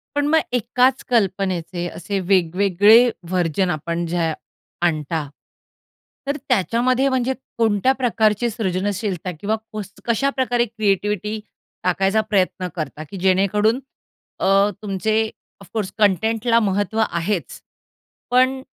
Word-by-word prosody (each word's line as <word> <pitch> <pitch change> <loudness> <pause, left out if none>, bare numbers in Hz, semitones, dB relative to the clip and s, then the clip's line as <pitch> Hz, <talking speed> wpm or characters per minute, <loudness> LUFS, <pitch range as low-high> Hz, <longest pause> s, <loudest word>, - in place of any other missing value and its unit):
पण 290 0 +1
मग 320 +2 +4
एकाच 250 +2 +2
कल्पनेचे 185 -5 0
असे 195 +3 -4
वेगवेगळे 195 +5 +4 0.2
वर्जन 180 0 +1
आपण 170 +1 -2
जे 165 -1 0 0.5
आणता, 155 -2 -1 1.0
तर 285 +1 -1
त्याच्यामध्ये, 250 +4 +2
म्हणजे 260 0 0 0.2
कोणत्या 225 +1 +3
प्रकारची 235 -3 +1
सृजनशीलता 195 -3 -2
किंवा 210 +4 0 0.2
कस 205 -2 -6
कशा 240 +4 +1
प्रकारे 245 -3 +1
क्रिएटिव्हिटी 210 -1 -1 0.4
टाकायचा 195 +4 +2
प्रयत्न 190 -3 0
करता, 155 -2 -5
की 200 - -7
जेणेकरून 200 +5 +2 0.6
अ, 195 +1 +4
तुमचे 215 +2 0 0.3
ऑफ 195 - -13
कोर्स 210 -4 -2
कंटेंटला 220 +4 +2
महत्व 205 +1 0
आहेच, 175 +2 -3 0.7
पण 260 +1 +3
205 Hz, 110 wpm, -21 LUFS, 185-230 Hz, 1.0 s, मग